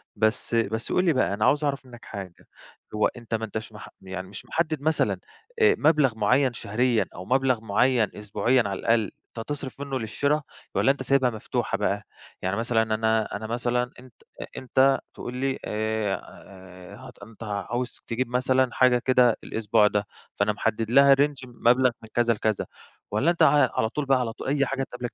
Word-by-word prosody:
بس 110 +2 0
بس 110 0 -1
قُل 180 - +2
لي 165 - +4
بقى 130 -7 +1
أنا 105 +1 0
عاوز 145 +3 +3
أعرف 140 -2 -1
منّك 120 -2 -13
حاجة، 95 -4 -9 0.5
هو 105 - +3
أنت 120 -2 -9
ما 110 0 -2
أنتش 110 +1 -6
مح 105 - -10
يعني 95 -1 -6
مش 100 - -10
محدد 155 -3 -1
مثلًا 160 +1 +1 0.4
آآ 430 -1 +6
مبلغ 145 -8 +3
مُعيّن 125 +4 +2
شهريًا، 115 +2 0
أو 90 - -8
مبلغ 130 -2 +2
معيّن 120 +2 +2
أسبوعيًا 115 +5 +1
على 100 -1 -4
الأقل، 115 -3 +1 0.3
أنت 115 - -5
تصرف 140 -2 -5
منّه 140 -2 -3
للشراء، 140 +7 0 0.3
والّا 135 - +4
أنت 135 -1 -4
سايبها 130 -1 +3
مفتوحة 110 -3 -3
بقى؟ - - -1 0.4
يعني 95 +2 -1
مثلًا 115 0 +1
أنا 110 0 0
أنا 110 +2 -5
مثلًا 120 +1 -1
أنت 125 -2 -15 0.3
أ - - -4
أنت 135 +1 +3
تقول 125 +1 -7
لي 135 0 -1
آآ 100 -3 -5
ه 130 +1 -11
أنت 115 0 -12
عاوز 110 +4 -4
تجيب 120 +1 -1
مثلًا 130 +1 +2
حاجة 125 -1 +4
كده 125 -3 +4
الأسبوع 110 -1 +2
ده، 105 -1 -1 0.3
فأنا 100 +1 +1
محدد 110 +1 -2
لها 140 +1 +7
range 140 -2 0
مبلغ 125 +1 +3
من 110 - -12
كذا 120 -1 +3
لكذا، 110 -1 -1 0.5
والّا 130 +12 +2
أنت 170 - +2
ع 150 - +5
على 110 - +2
طول 150 +2 -3
بقى 135 -1 +3
على 115 -3 -2
طول - - -8
أي 140 0 +2
حاجة 135 +1 -2
تقابلك 125 -2 -6
120 Hz, 185 wpm, -25 LUFS, 110-130 Hz, 0.5 s, لها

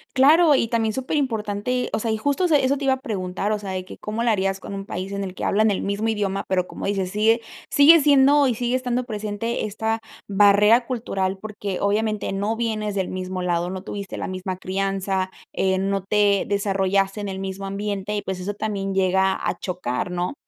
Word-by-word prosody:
Claro, 300 +4 +6
y 230 - +1
también 225 -1 0
superimportante, 250 -3 -1
o - - +1
sea, 225 - -2
y 220 - 0
justo 285 +10 0
eso 330 -4 +3
eso 280 0 +2
te 275 - -4
iba 265 - +4
a - - -2
preguntar, 195 -3 -3
o 210 - 0
sea, 200 -2 -6
de 185 -1 -4
que - - -11
cómo 215 +2 -3
la 235 - +3
harías 195 -2 0
con 200 - -8
un 195 0 -5
país 190 0 -5
en 200 0 -3
el 185 -1 -6
que - - -6
hablan 215 +2 +3
el 200 - 0
mismo 205 +3 -1
idioma, 205 -3 -1
pero, 185 -1 +1
como - - -6
dices, 195 -2 -1
sigue 220 +3 +3 0.3
sigue 310 +3 +7
siendo, 285 0 +5
y 245 - 0
sigue 245 +2 -1
estando 250 -1 -1
presente 215 0 -3
esta 220 +2 -2 0.3
barrera 205 +4 +5
cultural, 195 -6 -2
porque 205 -2 -5
obviamente 210 0 0
no 205 +3 -1
vienes 215 -3 -2
del 190 -2 -1
mismo 185 0 -4
lado, 175 0 0
no 185 0 -6
tuviste 200 -1 -6
la - - -3
misma 185 0 -4
crianza, 190 0 -1 0.2
eh, 190 0 +1
no 195 0 -1
te 205 0 +2
desarrollaste 195 0 0
en 205 - -4
el 190 0 -5
mismo 195 0 -5
ambiente, 200 0 -3
y 205 - -1
pues, 190 -1 -4
eso 200 +3 -4
también 200 -2 -3
llega 190 0 +3
a 175 - -2
chocar, 180 -5 -3
¿no? 180 +4 -2
205 Hz, 210 wpm, -23 LUFS, 190-225 Hz, 0.3 s, sigue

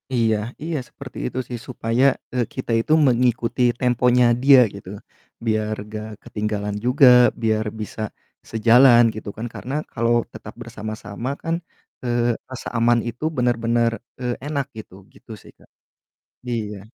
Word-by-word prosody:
Iya 115 -3 +2 0.3
iya 165 -2 -2
seperti 140 -3 -11
itu - - -8
sih 120 -2 -5
supaya, 120 0 -1 0.3
eee, 125 -2 +1
kita 130 -3 -4
itu 155 - 0
mengikuti 120 -1 +1 0.2
temponya 125 0 +3 0.2
dia 135 -2 +8
gitu, 100 -2 -10 0.6
biar 110 -1 0 0.2
gak 110 0 -5 0.2
ketinggalan 105 -1 -3
juga, 130 +2 +5 0.4
biar 110 -1 +1 0.2
bisa 105 - -6 0.5
sejalan 120 +2 +6
gitu 110 -1 -6
kan, 115 - -4
karena 130 +3 -7 0.2
kalau 115 0 +1 0.2
tetap 110 -1 -10
bersama-sama 110 +1 -6
kan, 165 0 0 0.5
eee, 120 -1 0 0.2
rasa 130 -1 -7
aman 120 0 +3
itu 120 +6 -10
bener-bener, 115 -1 +1 0.3
eee, 125 -1 -1
enak 140 -2 -2
gitu, 110 -4 -10 0.2
gitu - - -16
sih, - - -16
Kak. - - -23 0.8
Iya. 105 -4 -3
120 Hz, 140 wpm, -22 LUFS, 110-125 Hz, 0.8 s, dia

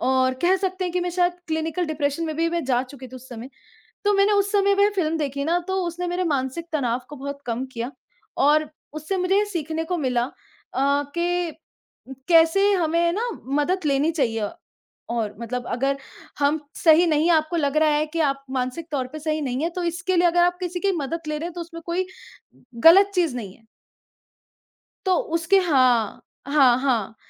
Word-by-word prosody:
और 260 0 +2
कह 365 +2 +4
सकते 375 -1 -2
हैं 355 - -3
कि 360 - 0
मैं 355 0 -2
शायद 355 0 +2 0.2
क्लिनिकल 320 +2 -1
डिप्रेशन 300 +1 -1
में 315 -1 -3
भी 330 +1 +1
मैं 340 -2 -2
जा 250 -1 +1
चुकी 260 0 -11
थी 255 - -10
उस 255 +1 -13
समय। 240 +2 -8 0.5
तो 410 - +4
मैंने 395 +1 +4
उस 400 0 +2
समय 400 -1 +3
में 400 +1 +4
फ़िल्म 325 -4 0
देखी 280 -2 -2
ना, 335 +3 +2
तो 380 0 0
उसने 355 +1 -4
मेरे 355 +1 -1
मानसिक 280 +1 -2
तनाव 250 -5 0
को 295 - -9
बहुत 280 +1 -6
कम 240 +2 -2
किया। 235 +2 -4 0.5
और 300 +2 +3 0.2
उससे 310 +5 -3
मुझे 370 +2 +2
ये 415 - +3
सीखने 325 -4 -3
को 360 +2 -2
मिला 250 -4 0 0.5
अ, 280 +2 +2
कि 350 -1 0 0.8
कैसे 345 +4 +5
हमें 340 -1 +2
ना 455 +6 -1 0.3
मदद 350 +4 0
लेनी 285 +3 +2
चाहिए। 225 -8 0 0.6
और 225 -3 -2
मतलब 245 +1 -4
अगर 275 +3 0 0.4
हम 290 +2 +2 0.2
सही 325 +1 +5
नहीं 310 -1 +2
हैं 340 - +5
आपको 310 +2 -1
लग 290 -2 0
रहा 310 0 +4
है 300 +1 +1
कि 330 +2 -4
आप 275 -3 0
मानसिक 260 +5 -3
तौर 265 -3 -1
पे 310 - -6
सही 310 0 -1
नहीं 260 +1 -2
हैं 335 - 0
तो 360 - -4
इसके 350 +2 -1
लिए 350 +1 +4
अगर 345 +1 +3
आप 355 0 +2
किसी 355 0 -3
की 395 +1 +1
मदद 320 +3 -3
ले 305 0 -2
रहे 330 - -4
हैं 345 - -7
तो 350 - -6
उसमें 335 0 -8
कोई 360 +2 -1 0.8
ग़लत 390 +5 +8
चीज़ 335 -9 +1
नहीं 200 -5 -6
है। 225 - -28 1.4
तो 375 -1 +3 0.2
उसके 340 +4 +3
हाँ, 255 - +2 0.3
हाँ, 270 -4 +5
हाँ। 235 -6 0
315 Hz, 200 wpm, -23 LUFS, 270-350 Hz, 1.4 s, ग़लत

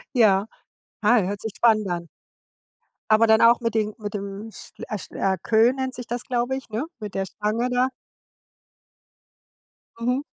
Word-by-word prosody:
Ja. 205 -4 +4 0.6
Ei, 215 +1 +4
hört 200 +1 -4
sich 220 -2 -5
spannend 215 -3 +3
an. 170 -1 -3 1.0
Aber 220 +1 +6
dann 220 0 +5
auch 230 +1 +6
mit 230 -2 -2
den 215 -1 0
mit 205 -2 -5
dem 200 +2 -6
sch - - -12
a 215 - -4
schl - - -10
a 190 -1 +1
Queue 225 +6 +4
nennt 260 -1 -3
sich 245 - -7
das, 240 0 -4
glaube 245 +1 -1
ich, 265 - -8
ne, 220 +5 -2 0.2
mit 210 -2 -7
der 195 - -1
Stange 215 +5 -2
da. 250 +1 +2 2.1
Mhm. 250 +3 0
220 Hz, 170 wpm, -24 LUFS, 205-240 Hz, 2.1 s, Aber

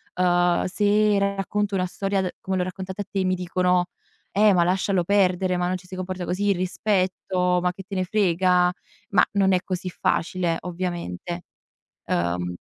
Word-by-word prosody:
uhm, 175 -1 +3
se 205 +1 +2
racconto 200 +1 -1
una 185 -1 +1
storia 195 +1 -1
d 185 - -1
come 190 0 -3
l'ho 180 - +1
raccontata 190 +2 -5
a - - -5
te 195 -1 -1
mi 185 0 +2
dicono: 180 0 +1 0.4
"Eh, 210 0 +5
ma 175 -1 +4
lascialo 185 0 +1
perdere, 185 -1 +2
ma 175 0 0
non 185 - 0
ci 180 0 -17
si 185 - -8
comporta 185 0 -4
così, 200 +4 0
il - - +1
rispetto, 185 -1 0
ma 180 0 +1
che 195 - -10
te 195 +1 -7
ne 185 - +1
frega?" 180 -2 +3 0.4
Ma 180 -3 +4
non 195 -1 +3
è 180 - +3
così 185 -1 -3
facile 175 -1 0
ovviamente. 175 - -4 0.6
Uhm 90 +1 -1
185 Hz, 175 wpm, -24 LUFS, 180-195 Hz, 0.6 s, Eh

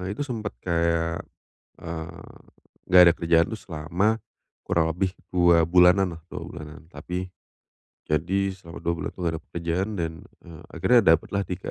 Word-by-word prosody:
itu 145 - -2
sempet 115 -7 -5
kayak, 85 -1 0 0.6
eee, 85 0 -7 0.6
enggak 90 0 +7
ada - - +6
kerjaan 85 0 +3
itu 110 - -4
selama 90 +7 -1 0.4
kurang 80 -1 +1
lebih 90 +2 -1 0.2
2 85 -2 +5
bulanan 90 +1 +4
lah, - - -21
2 - - -7
bulanan. 80 -3 -9
Tapi, 90 +1 -5 0.8
jadi 95 +6 0
selama 85 -3 -11
2 85 0 -1
bulan 85 - -4
itu - - -34
nggak 85 -1 0
ada - - -20
pekerjaan 85 +4 -2
dan, 80 -1 -2 0.3
eee, 85 -2 -11
akhirnya 125 -1 +4 0.2
dapatlah 100 +5 -3
3 90 +1 -5
85 Hz, 155 wpm, -25 LUFS, 85-95 Hz, 0.8 s, enggak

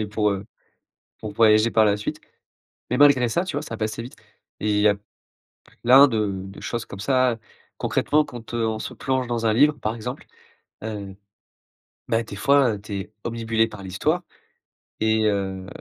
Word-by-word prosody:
et 105 - -1
pour, 105 0 0
heu, 100 0 -3 0.8
pour 105 -2 -6
voyager 110 +1 +4
par 110 -1 +4
la 105 -1 +3
suite 105 - -5 0.7
mais 125 - +1
malgré 140 -4 +6
ça, 170 +9 0
tu 185 - -5
vois? 145 - -2
Ça 115 -6 -6
passait 110 +1 -3
vite 125 - -10 0.4
et 105 - -1
il 105 0 +2
y 105 - +5
a 100 - +3 0.9
plein 135 +4 +8
de 105 -4 0
de 95 0 -10
choses 120 -1 -4
comme 100 - -10
ça. 130 +1 +2 0.4
Concrètement 150 +1 +1
quand, 120 -1 -10
heu, 115 -1 0
on 110 0 -2
se - - -6
plonge 130 -2 -1
dans 115 -1 -2
un 110 - +3
livre, 145 +5 +5
par 110 0 -2
exemple, 125 +4 -6 0.6
heu, 100 -3 -6 0.9
bah, 115 -1 +1
des 100 - -9
fois, 135 -3 +3
tu 105 0 -9
es 105 - -12
obnubilé 115 -1 0
par 105 -2 -10
l'histoire 155 - -1 0.8
et 110 0 +2
heu, 95 -2 -1
110 Hz, 180 wpm, -23 LUFS, 105-125 Hz, 0.9 s, plein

